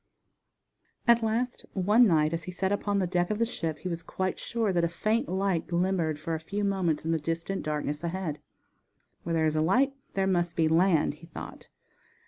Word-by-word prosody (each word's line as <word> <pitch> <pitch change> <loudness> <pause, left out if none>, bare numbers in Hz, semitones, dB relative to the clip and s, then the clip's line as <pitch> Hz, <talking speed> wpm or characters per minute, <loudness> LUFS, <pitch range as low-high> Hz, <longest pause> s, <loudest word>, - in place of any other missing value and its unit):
At 235 0 +6
last 230 +3 -1
one 210 +6 +5
night 155 -3 +3
as 165 -1 -3
he 180 - -5
sat 190 +2 -1
upon 205 0 0
the 190 - +2
deck 175 0 0
of 215 - 0
the 230 - +2
ship 165 -9 -3
he 185 - -6
was 170 -2 -3
quite 185 +2 -3
sure 225 -4 -1
that 170 -1 +2
a - - +4
faint 220 +9 0
light 190 -2 0
glimmered 175 -3 0
for 165 +1 -3
a 160 - -1
few 200 +6 -3
moments 185 -6 0
in 165 - 0
the 165 - +1
distant 165 +5 -3
darkness 150 0 -3
ahead. 170 -3 -3 0.8
Where 170 - -3
there 160 -1 +2
is 155 0 +1
a 155 - +2
light 255 - +3 0.2
there 195 -1 +2
must 175 -2 +1
be 160 -1 +3
land, 165 -1 +3
he 165 - -12
thought. 165 - -9
175 Hz, 205 wpm, -28 LUFS, 165-200 Hz, 0.8 s, At